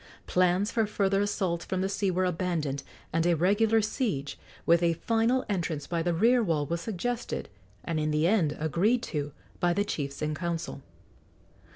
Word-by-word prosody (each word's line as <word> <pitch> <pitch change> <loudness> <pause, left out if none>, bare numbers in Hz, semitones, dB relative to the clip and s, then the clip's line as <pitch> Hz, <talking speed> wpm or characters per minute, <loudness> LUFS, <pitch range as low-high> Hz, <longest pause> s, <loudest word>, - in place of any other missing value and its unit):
Plans 185 +3 +2
for 225 -2 +1
further 195 -1 +1
assaults 185 -4 -1
from 185 -1 -2
the 190 - +1
sea 195 0 0
were 185 +1 +1
abandoned, 165 -6 -1 0.3
and 165 0 +2
a 175 - +4
regular 210 +6 +3
siege, 205 - -2 0.3
with 170 +1 +5
a 170 -1 +3
final 230 +7 +1
entrance 170 -7 -2
by 170 -1 -1
the 175 +1 +1
rear 235 +9 +4
wall, 160 -8 +1
was 170 +4 -2
suggested 235 +5 -3 0.3
and 165 -2 -2
in 155 0 0
the 150 +1 +2
end 170 -6 +2
agreed 185 - +2
to 145 -2 -3 0.3
by 175 -1 +2
the 205 +3 +1
chiefs 140 -7 -4
in 150 0 0
council. 170 -3 -3
175 Hz, 175 wpm, -28 LUFS, 160-205 Hz, 0.3 s, with